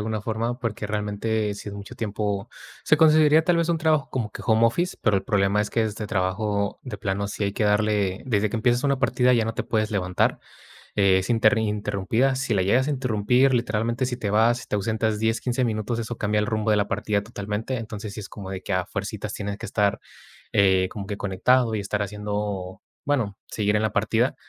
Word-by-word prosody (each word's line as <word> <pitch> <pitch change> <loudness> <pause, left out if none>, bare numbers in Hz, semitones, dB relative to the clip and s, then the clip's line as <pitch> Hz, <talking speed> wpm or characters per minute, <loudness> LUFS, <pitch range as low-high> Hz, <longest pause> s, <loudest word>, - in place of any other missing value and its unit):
alguna 110 0 -3
forma, 115 +2 -2
porque 110 -4 -3
realmente 105 +1 -1
si 105 - -8
es 100 - -7
mucho 100 0 -9
tiempo 105 -2 -2 0.4
si - - +4
conseguiría 155 0 +5
tal 175 0 +3
vez 170 0 +1
un 170 - +2
trabajo 155 -4 +2
como 115 -5 -2
que - - -8
home 110 0 +4
office, 170 +11 +1
pero 110 - +3
el 95 - -1
problema 100 0 +2
es 105 - -1
que 115 - +1
este 110 -1 -3
trabajo 100 +1 -1
de 125 -6 -6
plano 100 0 -2
si 105 - -3
hay 100 - -1
que 105 - -1
darle 105 -2 +1
desde 110 -4 +1
que 115 - -3
empiezas 120 +4 +1
una 140 -2 +2
partida 125 -1 +3
ya 115 - +2
no 115 - -2
te - - -3
puedes 110 0 0
levantar. 90 -3 0 0.6
Es 95 +1 +3
inter 115 +1 +4
interrumpida, 105 +4 0
si 130 -2 -2
la 95 -3 +2
llegas 125 +8 +2
a - - +1
interrumpir, 125 0 +2
literalmente, 115 +1 0
si 125 -1 -3
te 110 -5 -3
vas, 115 +3 +3
si - - -10
te - - -2
ausentas 110 +1 0
10, 115 +1 +1
15 125 0 0
minutos, 115 +1 -2
eso 115 +1 -5
cambia 105 0 +1
el 105 - -1
rumbo 110 -2 0
de - - +3
la 105 0 +1
partida 105 -1 -1
totalmente. 105 +3 -4
Entonces, 110 -2 -6
sí 105 - -9
es 100 - -8
como 95 -3 -8
de 95 -1 -5
que 100 - -4
a 90 -1 +1
fuercitas 105 +1 -5
tienes 100 -1 -4
que - - -7
estar, 100 -2 +1 0.5
eh, 95 -2 +4
como 100 -3 -6
que 100 - -4
conectado, 110 +5 +2
y 105 - -2
estar 105 +1 -2
haciendo, 105 -2 -4 0.2
bueno 115 -9 0
seguir 105 -1 0
en 105 - +1
la 110 - 0
partida. - - +1
105 Hz, 220 wpm, -24 LUFS, 100-120 Hz, 0.6 s, conseguiría